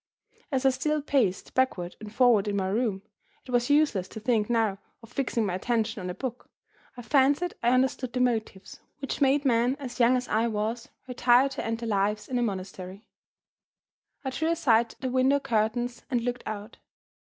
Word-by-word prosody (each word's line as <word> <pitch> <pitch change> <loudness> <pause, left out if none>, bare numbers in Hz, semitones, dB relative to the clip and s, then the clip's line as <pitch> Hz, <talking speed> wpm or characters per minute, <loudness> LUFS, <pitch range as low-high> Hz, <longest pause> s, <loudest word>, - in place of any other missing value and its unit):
As 265 -1 0
I 265 - +6
still 300 +4 0
paced 255 -10 0
backward 185 -9 0
and 215 -1 -9
forward 225 -3 +4
in 205 - -1
my 190 -1 0
room 205 -2 -1 0.4
it 255 - -9
was 245 +1 +1
useless 285 -11 +3
to 220 - -9
think 220 -1 +1
now 220 -4 +1 0.2
of 230 +2 -15
fixing 240 -4 0
my 190 - -2
attention 225 +2 -1
on 180 - -4
a 180 - -5
book 255 -2 -6 0.5
I 245 - -7
fancied 285 +7 +2
I 235 - +3
understood 255 0 +1
the 250 - -2
motives 225 -6 -2 0.2
which 275 +1 -5
made 280 +1 +3
men 245 +1 +3
as 260 -3 -7
young 245 +1 +5
as 250 - -4
I 225 +2 +1
was 220 +2 -3 0.2
retire 250 +1 +4
to 270 - -5
end 225 0 -2
their 230 - -3
lives 210 +1 0
in 250 -1 -1
a - - 0
monastery. 190 -1 -5 1.2
I 265 - -1
drew 320 +5 -1
aside 235 -9 +2
the 260 -1 -2
window 260 +2 +3
curtains, 240 +1 -1
and 245 -4 0
looked 245 +1 -4
out. 215 +1 -6
240 Hz, 190 wpm, -27 LUFS, 215-260 Hz, 1.2 s, I